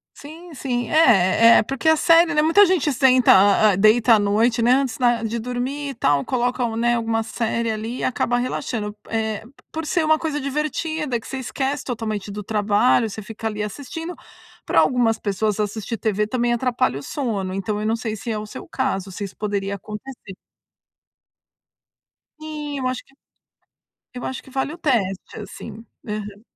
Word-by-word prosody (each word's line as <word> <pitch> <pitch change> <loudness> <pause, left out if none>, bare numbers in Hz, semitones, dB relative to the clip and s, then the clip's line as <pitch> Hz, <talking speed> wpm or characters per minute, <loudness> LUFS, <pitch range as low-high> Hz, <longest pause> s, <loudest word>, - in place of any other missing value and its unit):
Sim, 320 +3 -12
sim. 245 -4 -3
É 320 -4 +5 0.5
é - - +8
é - - +1
porque 270 +5 -4
a 320 - +6
série, 330 +2 +4
né 300 - +3
muita 330 +7 +6
gente 350 -6 +1
senta 255 -1 +5
hã, 200 +2 +5
hã, - - -1
deita 220 +3 +5
à - - +2
noite, 220 +3 +2
né, 240 +2 +4
antes 265 -3 0
da 240 -2 +2
de 225 +1 -2
dormir 250 +4 -3
e - - -5
tal. 140 -1 +1
Coloca 250 0 0
um 225 - -3
né, 240 +1 +2
alguma 225 -1 -1
série 230 0 -2
ali 220 +3 -4
e - - -4
acaba 245 -1 0
relaxando. 230 -4 -3
Eh, 220 -2 -1
p 245 - -16 0.2
por 320 0 -4
ser 320 +2 +1
uma 310 0 +3
coisa 310 -2 -2
divertida 300 -1 -2
que - - -13
você 270 - -5
esquece 270 +2 -3
totalmente 215 -5 -4
do 205 0 -6
trabalho 215 +2 +2
você 215 +2 -7
fica 225 +1 -6
ali 210 -1 -4
assistindo 290 - -6 0.5
pra - - +3
algumas 240 -3 +2
pessoas 210 +1 -1
assistir 215 +2 -3
TV 210 -1 0
também 240 +1 0
atrapalha 240 - 0
o - - -10
sono. 205 - -3
Então, 200 +2 -2
eu 215 - -1
não 225 - +1
sei 225 -2 -4
se 230 - -7
é 215 - -2
o 210 - -5
seu - - -10
caso. 195 -8 -2
Se 200 - -6
isso 195 - -7
poderia 200 -1 -2
acontecer. 210 +1 -9 2.0
Sim. 300 -2 -6
Eu 255 - -1
acho 255 0 -3
que - - -27 1.0
eu 250 - -6
acho 260 - -5
que - - -16
vale 270 +3 -2
o - - -10
teste 225 - -1
assim. 220 +1 -9 0.2
Aham. 210 -1 -5
235 Hz, 190 wpm, -22 LUFS, 210-270 Hz, 2.0 s, é